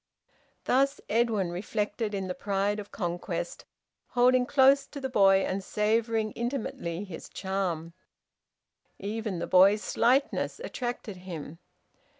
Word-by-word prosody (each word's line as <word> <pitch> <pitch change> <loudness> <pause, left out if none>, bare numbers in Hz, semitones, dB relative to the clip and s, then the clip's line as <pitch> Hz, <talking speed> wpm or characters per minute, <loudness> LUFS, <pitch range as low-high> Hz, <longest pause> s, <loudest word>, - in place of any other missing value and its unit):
Thus 275 +2 +2
Edwin 215 -5 +1
reflected 210 +3 -2
in 195 -1 -2
the 180 - -2
pride 200 +2 -1
of 205 - -8
conquest, 175 - -4 0.4
holding 250 0 +3
close 275 0 +5
to 285 - -8
the 265 -1 -4
boy, 195 -3 +5
and 190 +1 -2
savouring 220 +2 0
intimately 225 -8 -3
his 185 -5 -9
charm. 180 -4 -3 1.0
Even 210 -1 -3
the - - -2
boy's 195 +3 +5
slightness 265 +4 +1
attracted 240 - -5
him. 165 -3 -8
210 Hz, 120 wpm, -28 LUFS, 190-240 Hz, 1.0 s, close